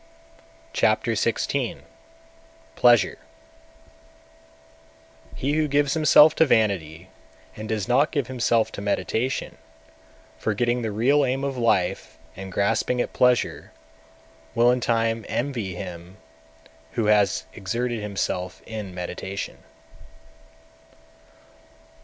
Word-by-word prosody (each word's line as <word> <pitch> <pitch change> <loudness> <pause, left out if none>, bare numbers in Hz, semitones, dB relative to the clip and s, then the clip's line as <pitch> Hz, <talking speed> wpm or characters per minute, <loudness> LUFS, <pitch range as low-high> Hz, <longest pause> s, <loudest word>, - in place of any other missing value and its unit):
Chapter - - +2
XVI. - - -1 0.9
Pleasure 120 -3 +4 2.2
209. - - -12
He 140 +3 -1
who 155 0 +1
gives 145 0 +1
himself 155 -1 +6
to 160 - +6
vanity, 95 - 0 0.5
and 110 0 -7
does 110 -3 -2
not 140 +5 +3
give 145 -5 -1
himself 120 -2 +1
to - - -7
meditation, 110 +5 -2 0.8
forgetting 120 +3 0
the 110 - -2
real 135 +8 +3
aim 135 +1 -1
(of 140 -1 -2
life) 115 -7 0 0.2
and 95 +1 -8
grasping 100 +6 0
at - - -2
pleasure, 125 -10 +1 0.8
will 120 +1 +5
in 125 - +1
time 115 -1 0
envy 120 -8 -3
him 90 0 -8 0.8
who 115 - -1
has 105 -2 +2
exerted 115 +3 -3
himself 95 -3 -3
in 105 -5 -7
meditation. 95 +2 -5
115 Hz, 105 wpm, -24 LUFS, 100-125 Hz, 2.2 s, himself